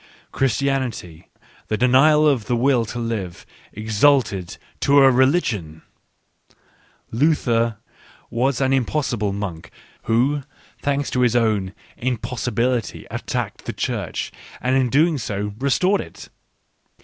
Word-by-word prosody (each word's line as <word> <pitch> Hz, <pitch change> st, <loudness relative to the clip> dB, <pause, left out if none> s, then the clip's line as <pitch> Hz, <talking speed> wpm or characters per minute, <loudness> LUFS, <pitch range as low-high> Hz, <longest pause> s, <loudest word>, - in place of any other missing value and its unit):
Christianity, 130 Hz, -, -2 dB, 0.4 s
the 110 Hz, -, -1 dB
Denial 140 Hz, +6 st, +5 dB
of 130 Hz, -7 st, +1 dB
the 120 Hz, -, 0 dB
Will 125 Hz, -1 st, +2 dB
to 120 Hz, -, -7 dB
Live, 110 Hz, -7 st, -4 dB, 0.3 s
exalted 110 Hz, -3 st, +1 dB, 0.2 s
to 140 Hz, 0 st, +3 dB
a 135 Hz, -1 st, +7 dB
religion! 120 Hz, -, +1 dB, 1.3 s
Luther 115 Hz, -4 st, +1 dB, 0.5 s
was 125 Hz, +2 st, 0 dB
an 135 Hz, 0 st, +2 dB
im 135 Hz, -1 st, +3 dB
possible 120 Hz, -9 st, -1 dB
monk 95 Hz, -5 st, -5 dB, 0.4 s
who, 130 Hz, +6 st, +2 dB, 0.4 s
thanks 140 Hz, 0 st, -1 dB
to 125 Hz, -, 0 dB
his 120 Hz, -1 st, +3 dB
own 105 Hz, -5 st, +1 dB
" -, -, -27 dB
impossi 125 Hz, 0 st, -2 dB
bility," 120 Hz, 0 st, -1 dB
attacked -, -, -4 dB
the -, -, -4 dB
Church, -, -, -3 dB, 0.3 s
and 130 Hz, +1 st, 0 dB
in 140 Hz, +5 st, +2 dB
so 105 Hz, -2 st, -4 dB
doing 105 Hz, 0 st, -5 dB
restored 180 Hz, +9 st, +2 dB
it -, -, -11 dB
125 Hz, 125 wpm, -21 LUFS, 110-135 Hz, 1.3 s, a